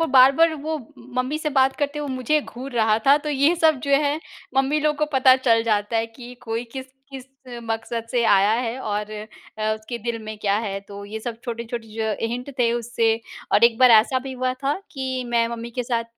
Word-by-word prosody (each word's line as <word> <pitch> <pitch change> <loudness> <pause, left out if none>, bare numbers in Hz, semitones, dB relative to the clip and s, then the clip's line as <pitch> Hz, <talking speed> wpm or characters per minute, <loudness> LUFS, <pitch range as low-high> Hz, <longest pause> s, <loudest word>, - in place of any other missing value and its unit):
वो 330 - +2
बार-बार 275 +5 +6
वो 315 +2 -3 0.4
मम्मी 255 +4 0
से 305 -1 -2
बात 265 -1 +3
करते 290 0 -2
हुए 295 - -4
मुझे 260 +4 +1
घूर 265 0 -9
रहा 220 -2 +2
था, 280 +1 +7
तो 300 - -6
ये 290 +3 +3
सब 315 -4 +3
जो - - -1
है 295 +1 0 0.4
मम्मी 270 +3 +2
लोग 300 0 +1
को 300 - +1
पता 260 -1 +6
चल 230 -3 +3
जाता 215 0 0
है 225 0 +1
कि 240 +2 -12
कोई 230 0 -3
किस 265 -1 -6 0.2
किस 265 -2 -8 0.4
मकसद 225 0 -4
से 245 -2 +1
आया 205 -1 +4
है 240 +1 -3
और 210 -2 -3 0.5
अ, 215 0 0
उसके 215 +2 -7
दिल 235 +1 -3
में 215 0 -7
क्या 200 -1 +1
है? 200 -3 -3
तो 200 0 -10
ये 215 +2 -6
सब 230 0 -6
छोटे-छोटे 235 -1 -5
जो 220 0 -2
हिंट 245 +4 -5
थे 235 -2 +3
उससे 235 -1 +1 0.4
और 215 - +6
एक 235 -1 +4
बार 255 -1 +7
ऐसा 260 +4 -1
भी 265 +1 -7
हुआ 255 0 -1
था 280 +5 +1
कि 260 -3 -3
मैं 235 -1 +2
मम्मी 235 0 -6
के 250 +1 -3
साथ 235 -1 -1
240 Hz, 220 wpm, -23 LUFS, 225-270 Hz, 0.5 s, था